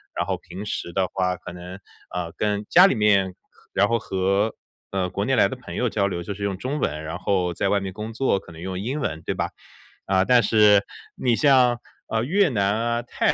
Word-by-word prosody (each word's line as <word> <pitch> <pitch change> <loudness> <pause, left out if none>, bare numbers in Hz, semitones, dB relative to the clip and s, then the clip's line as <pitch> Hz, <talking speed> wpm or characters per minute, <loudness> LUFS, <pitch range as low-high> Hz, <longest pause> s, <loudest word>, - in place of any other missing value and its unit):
然 - - -1
后 - - -1
平 95 - -9
时 85 -4 -4
的 95 0 +1
话 90 -1 0
可 - - -9
能， 90 +1 -9 0.4
嗯， 85 -2 -3
跟 105 0 -1
家 180 +2 +8
里 195 - +3
面， 100 -4 +3 0.4
然 100 - +3
后 115 - +2
和， 100 +1 0 0.4
呃， 95 -2 -1
国 100 +2 -2
内 135 - +2
来 105 - +5
的 - - -5
朋 125 - -10
友 125 -2 0
交 100 -2 +1
流， 85 -3 -3
就 100 +3 -5
是 100 - -6
用 100 -1 -1
中 135 +8 -3
文， 75 - -2
然 80 +2 -5
后 90 -1 0
在 - - 0
外 100 - +2
面 95 -1 -5
工 110 +3 -6
作， 120 -4 +1
可 90 - -15
能 80 - -11
用 95 0 -4
英 125 +9 -3
文 80 - -3
对 - - -2
吧。 - - -1 0.6
嗯， 95 -1 +3
但 125 -2 +5
是， 105 -2 +5 0.3
你 120 -2 +1
像， 125 -3 +4 0.3
呃， 110 0 0
越 190 +7 +3
南 100 -4 +1
啊， 120 +1 0
泰 120 - 0
100 Hz, 245 characters per minute, -24 LUFS, 95-120 Hz, 0.6 s, 家